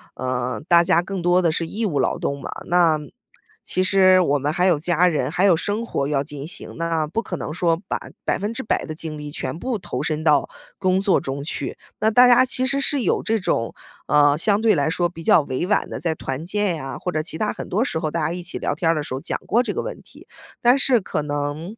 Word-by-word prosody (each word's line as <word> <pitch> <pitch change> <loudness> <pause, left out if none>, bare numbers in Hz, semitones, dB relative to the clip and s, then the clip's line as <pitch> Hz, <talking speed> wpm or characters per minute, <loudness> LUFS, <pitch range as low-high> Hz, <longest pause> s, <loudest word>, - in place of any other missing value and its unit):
呃， 130 -1 -3
大 170 -1 +6
家 170 -1 +3
更 190 +1 -5
多 175 +1 +3
的 170 -3 +2
是 165 +1 -2
义 220 +5 -3
务 155 -9 -1
劳 - - +1
动 140 0 -3
嘛， - - -7 0.2
那 170 -3 +4 0.7
其 185 - +1
实 185 -1 +5
我 145 -4 +1
们 145 +2 -1
还 180 +1 +1
有 175 -5 +3
家 175 +2 +2
人， 160 -4 0
还 180 +5 0
有 185 -4 +6
生 210 +7 -2
活 140 -11 -2
要 140 -2 0
进 145 0 -8
行， 175 - -6
那 165 -1 0
不 170 +9 -2
可 - - -5
能 150 - -5
说 170 -1 +1
把 - - -1 0.3
100% 220 +4 -1
的 155 - -6
精 155 -1 -6
力 150 0 -7
全 140 0 -5
部 250 +1 -2
投 195 - -5
身 155 0 -2
到 150 -3 +3 0.3
工 185 -1 +2
作 195 -1 +3
中 140 +1 -5
去。 155 - -4 0.2
那 220 - +3
大 245 +3 +6
家 245 +1 +6
其 255 0 +2
实 275 +1 0
是 285 -1 0
有 - - +1
这 225 0 0
种 115 - -1 0.3
呃， 145 0 +4
相 205 +4 +2
对 225 -2 +4
来 145 -3 +1
说 175 +1 0
比 165 -1 -11
较 165 - +5
委 140 +5 -3
婉 210 - +1
地， - - -5
在 165 -2 -1
团 135 +1 -5
建 200 -1 0
呀， 135 -4 -6
或 180 - -3
者 155 - -1
其 160 0 -5
它 210 +2 0
很 - - -7
多 210 +6 +1
时 160 -11 -2
候 155 - -2
大 165 +2 -2
家 155 - -1
一 180 - -5
起 175 - -5
聊 - - -1
天 165 - 0
儿 165 - +3
的 150 - -2
时 145 - -6
候 130 - -3
儿， - - -14
讲 - - -3
过 235 +3 +3
这 - - -3
个 - - -2
问 - - -7
题。 - - -17 0.3
但 245 +3 +5
是 255 -3 +4
可 185 - -3
能 145 +6 -4
170 Hz, 270 characters per minute, -22 LUFS, 150-200 Hz, 0.7 s, 大